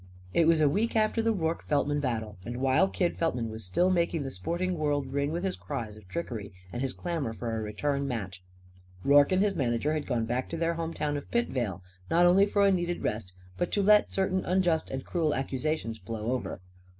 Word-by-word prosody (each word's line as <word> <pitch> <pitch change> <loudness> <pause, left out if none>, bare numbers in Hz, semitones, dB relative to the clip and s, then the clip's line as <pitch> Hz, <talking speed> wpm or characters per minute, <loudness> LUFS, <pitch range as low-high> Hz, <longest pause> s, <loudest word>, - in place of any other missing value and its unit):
It 165 - +4
was 165 -1 +4
a 150 - +5
week 210 +12 +1
after 215 +1 +2
the 225 0 +2
Rorke 165 -5 -2
Feltman 145 0 +1
battle, 110 -7 -3
and 120 +3 -5
while 135 +8 +3
Kid 180 -2 -1
Feltman 125 -9 0
was 110 0 -7
still 175 - +2
making 170 -3 +1
the 135 - -4
sporting 175 - -2
world 145 -3 0
ring 140 +1 0
with 170 +3 -2
his 190 -1 -1
cries 115 -7 -5
of 105 -3 -15
trickery 115 - -5 0.2
and 120 - -3
his 135 -1 0
clamour 160 -10 -3
for 115 0 -3
a 110 - -2
return 140 +7 -1
match. 95 -7 -4 0.6
Rorke 140 +2 +6
and 185 +1 +4
his 205 -2 +1
manager 130 0 0
had 155 -1 -2
gone 120 -4 0
back 125 +3 -2
to 165 - -4
their 165 0 +1
home 165 0 -4
town 145 -1 -1
of 145 - -8
Pitvale; 120 - -1 0.3
not 175 +1 +5
only 190 +3 +6
for 200 0 +3
a 200 - +5
needed 175 -2 -1
rest, 105 -3 -2 0.3
but 175 - -1
to 205 - +2
let 210 +1 +5
certain 190 -1 0
unjust 180 -3 +1
and 135 0 -4
cruel 160 -4 0
accusations 135 -3 -2
blow 110 +4 -4
over. 130 -7 -3
145 Hz, 215 wpm, -29 LUFS, 120-175 Hz, 0.6 s, Rorke